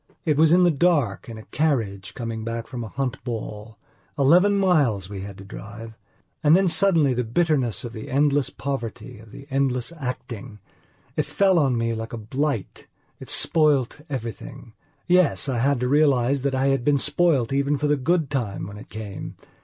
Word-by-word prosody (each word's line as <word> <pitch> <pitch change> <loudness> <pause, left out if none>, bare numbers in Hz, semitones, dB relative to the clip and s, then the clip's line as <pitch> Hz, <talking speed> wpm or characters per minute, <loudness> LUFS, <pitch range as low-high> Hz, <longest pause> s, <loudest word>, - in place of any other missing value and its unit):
It 150 - +2
was 155 +1 +4
in 180 +1 +6
the 175 - +5
dark, 145 - +1
in 115 - -7
a 110 - -10
carriage, 115 -11 -1
coming 115 -2 -4
back 115 0 -4
from 120 0 -6
a - - -6
hunt 130 +1 -4
ball. 110 -2 -6 0.4
Eleven 180 +9 +5
miles 140 - +2
we 100 - -5
had 100 0 -8
to 100 - -10
drive! 110 +3 -9 0.5
And 150 +2 +6
then 190 0 +2
suddenly 165 -5 +3
the 125 0 -1
bitterness 125 - 0
of 120 - -7
the 110 -2 -8
endless 140 -1 +2
poverty, 130 -3 -5
of 110 -1 -15
the 140 - -11
endless 135 -1 0
actingit 125 -7 -6 0.6
fell 190 -3 +2
on 135 -5 +2
me 115 0 0
like 115 +1 -6
a - - -3
blight, 130 +1 -3 0.3
it - - -10
spoilt 150 -5 +2
everything. 120 -1 -7 0.3
Yes, 180 -5 +3
I 130 -3 -1
had 140 +1 +2
to 125 - +1
realize 140 -2 +3
that 135 0 -1
I 135 +1 +2
had 135 -2 +1
been 145 +2 +3
spoilt 145 -3 +2
even 140 +1 +1
for 150 - -2
the 150 0 +3
good 155 +1 0
time 110 -10 -2
when 100 +2 -9
it 105 - -12
came. 105 -3 -7
130 Hz, 185 wpm, -24 LUFS, 115-150 Hz, 0.6 s, in